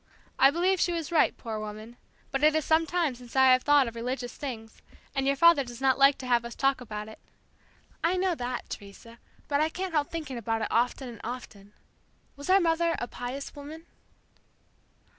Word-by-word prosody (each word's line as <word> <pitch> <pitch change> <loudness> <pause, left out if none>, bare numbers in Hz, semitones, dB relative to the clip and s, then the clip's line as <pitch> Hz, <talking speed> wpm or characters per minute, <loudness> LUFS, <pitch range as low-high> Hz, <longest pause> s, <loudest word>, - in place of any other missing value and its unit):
I 270 - +8
believe 360 +5 +1
she 355 - +2
was 330 -2 -4
right, 325 - +3
poor 220 -3 -5
woman, 215 +2 -8 0.4
but 270 - -1
it 305 0 +5
is 315 - 0
sometime 325 -1 +2
since 245 0 -13
I 265 -1 +6
have 255 0 +5
thought 290 -2 +4
of 230 - -6
religious 245 +1 -4
things, 230 -6 -7 0.3
and 270 -1 -1
your 275 - +3
father 335 0 +6
does 240 -2 -10
not 270 0 +2
like 275 0 +6
to 260 - -8
have 240 -2 +2
us 235 0 -8
talk 275 -1 +1
about 210 -3 -6
it." 220 - -12 0.8
"I 345 +3 +2
know 370 -1 +1
that, 250 -4 -4
Teresa, 220 +3 -10 0.3
but 285 0 +1
I 310 - +2
can't 370 +1 -5
help 295 -2 +1
thinking 300 -7 -5
about 225 0 -2
it - - -2
often 250 +3 0
and 235 -3 -10
often. 215 -4 -8 0.6
Was 285 +4 -8
our 385 +1 +6
mother 335 -1 +1
a 240 - -4
'pious 250 +4 -6
woman?'" 305 +3 -10
270 Hz, 200 wpm, -28 LUFS, 235-315 Hz, 0.8 s, I